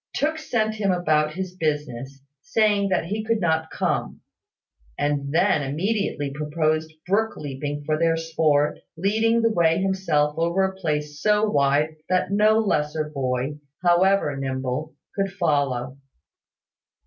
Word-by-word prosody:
Tooke 310 +2 0
sent 220 -7 0
him 205 -3 0
about 155 -4 +1
his 185 -1 -5
business, 145 -5 -3 0.2
saying 205 0 +2
that 185 - +1
he 210 +5 -3
could 225 0 0
not 160 -3 0
come; - - -2 0.8
and 145 -1 -1
then 175 0 +3
immediately 150 0 -1
proposed 155 +2 -1
brook 215 +4 0
leaping 145 +1 -5
for 155 0 0
their 165 -1 +2
sport, 155 -3 +1 0.2
leading 220 +5 +2
the 230 - +3
way 165 -4 +3
himself 175 -6 +1
over 170 +3 +2
a 190 0 -1
place 150 -5 -3
so 210 0 +3
wide 145 -1 +2
that 185 +1 +1
no 215 +2 +4
lesser 155 -7 0
boy, 135 +1 -2 0.2
however 175 -3 +3
nimble, 135 +2 -3 0.2
could 195 -1 -1
follow. 140 -8 -1
160 Hz, 135 wpm, -24 LUFS, 145-195 Hz, 0.8 s, no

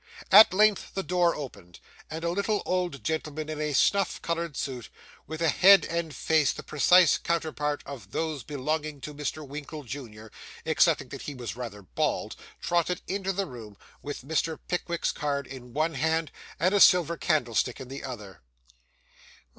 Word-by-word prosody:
At 210 +3 +10
length 210 +1 +2
the 195 - -1
door 175 -1 +2
opened, 100 -11 -9 0.3
and 160 +1 -6
a 170 - 0
little 200 +3 0
old 180 -6 -1
gentleman 155 -1 -3
in 155 -1 -4
a 150 0 -1
snuff 200 +8 +2
coloured 170 -3 -2
suit, 125 -4 -4 0.4
with 160 +1 -4
a 165 - +4
head 190 +2 +7
and 170 -1 -3
face 155 0 +2
the - - -8
precise 175 +3 +5
counterpart 155 -3 -2
of 120 -9 -9
those 155 +4 -2
belonging 150 +2 -3
to 150 +3 -7
Mr. 150 +1 -5
Winkle, 150 +2 -7
junior, 110 -5 -9 0.3
excepting - - +2
that - - -8
he 145 - -7
was 120 -4 -6
rather 115 -5 -7
bald, - - -2 0.2
trotted 175 +1 0
into 195 0 -2
the 195 +1 -1
room 110 - -10 0.2
with 145 -3 -6
Mr. 160 +1 -1
Pickwick's 170 -1 -1
card 140 -2 -2
in 125 -2 -10
one 155 +5 0
hand, 160 +2 0 0.3
and 185 +5 +2
a 205 - +4
silver 175 -3 +6
candlestick 125 -7 0
in 130 - -8
the 135 +2 -7
other. 105 -9 -8
155 Hz, 165 wpm, -27 LUFS, 135-170 Hz, 0.4 s, At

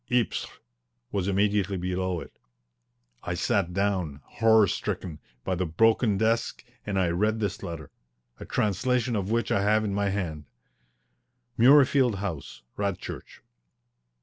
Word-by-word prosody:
"Ypres" 120 -3 0 0.6
was 100 -2 -1
immediately 100 0 +1
below 90 -1 -2
it. - - -11 0.9
I 90 - -3
sat 95 0 0
down, 90 -7 -1
horror 110 -1 +4
stricken, 85 -3 -4 0.2
by 95 - -1
the 90 0 -1
broken 110 +4 +3
desk, 115 +4 0 0.2
and 100 -2 -1
I 90 -2 +2
read 105 +6 0
this 100 -3 -2
letter, 80 -4 -7 0.5
a - - -8
translation 120 +4 0
of 100 -1 -2
which 115 +1 0
I 100 - +2
have 110 +2 +2
in 100 - -2
my 100 0 0
hand: 85 -7 -3 1.1
MURREYFIELD 130 -1 +5
HOUSE, 85 -12 -6
RADCHURCH. 100 -3 -5
100 Hz, 130 wpm, -27 LUFS, 90-110 Hz, 1.1 s, MURREYFIELD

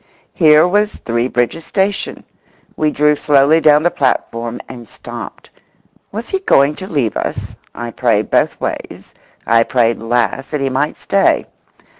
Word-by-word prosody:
Here 155 0 +5
was 210 +3 +1
Three 120 +1 -2
Bridges 125 +6 -1
station. 195 +2 -2 0.5
We 155 - +1
drew 150 0 +2
slowly 145 +2 +3
down 150 -1 +5
the 175 - +2
platform 120 -3 -2
and 120 -3 -10
stopped. - - -10 0.6
Was 220 +3 -6
he 385 - -1
going 145 - +3
to 190 - -7
leave 140 - -1
us? - - -4 0.2
I 120 0 -5
prayed 110 -4 0
both - - +1
ways—I 115 0 -3
prayed 115 -1 +1
last 120 +3 -1
that 150 - -2
he 135 - 0
might 140 +3 -1
stay. 195 0 +1
140 Hz, 145 wpm, -16 LUFS, 120-160 Hz, 0.6 s, Here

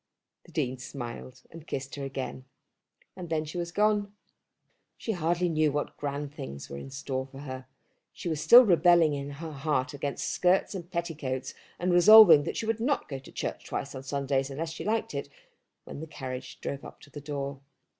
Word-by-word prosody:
The - - -16
Dean 125 0 -2
smiled, 125 -1 -8
and 165 -1 -12
kissed 135 0 -4
her 140 - -5
again, 135 -1 -5 0.7
and 180 -3 -8
then 160 -1 0
she 160 +4 -5
was 170 0 -3
gone. 210 0 +2 0.9
She 225 - -3
hardly 175 -1 0
knew 155 -2 +2
what 145 +1 -3
grand 145 0 -4
things 70 - -8
were 70 - -5
in 135 - -8
store 135 -1 -4
for 135 +1 -11
her. 130 -2 -7 0.4
She - - -7
was 155 -3 -1
still 245 +8 +9
rebelling 170 -4 +5
in 140 0 -4
her 155 +3 -7
heart 140 -2 -1
against 140 0 -3
skirts 180 +3 +2
and 175 -3 -7
petticoats, 155 -7 -3 0.2
and 180 0 0
resolving 175 -5 +9
that - - -3
she - - -2
would 225 0 0
not 270 +5 0
go 135 -2 -4
to 135 - -14
church - - -4
twice 140 - -4
on 130 - -6
Sundays 140 0 -1
unless 160 +4 -4
she 165 - -6
liked 220 +2 -1
it, - - -4 0.5
when - - -9
the 160 - -6
carriage 130 -3 -7
drove 140 - -4
up - - -11
to 145 - -16
the 145 - -8
door. 140 -1 -4
145 Hz, 195 wpm, -28 LUFS, 135-175 Hz, 0.9 s, still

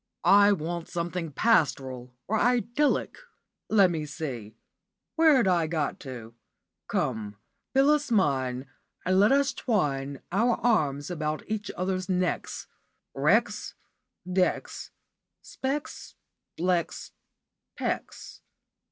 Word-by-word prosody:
I 205 +1 +6
want 170 -2 -2
something 170 -2 -3
pastoral 135 - +1 0.2
or 220 +2 +1
idyllic. 245 +4 +1 0.5
Let 200 -4 +5
me 155 -3 -3
see, 125 -9 -6 0.6
where 315 -6 +5
'd - - 0
I 170 -3 +2
got 155 -3 -2
to? 120 -4 -9 0.5
'Come, 105 -2 -2 0.4
Phyllis 290 +2 +4
mine, 135 - +1 0.4
and 185 +1 +3
let 205 +4 +5
us 280 0 +3
twine 140 - -1
our 230 +6 +2
arms 150 - +1
about 155 -2 -2
each 210 -1 -3
other's 185 0 -2
necks.' 180 -1 -1 0.5
Wrecks, - - +1 0.5
decks, 185 0 -1 0.5
specks, 275 +3 -5 0.4
flecks, 175 0 -1 0.7
pecks. - - -4
180 Hz, 100 wpm, -27 LUFS, 145-220 Hz, 0.7 s, I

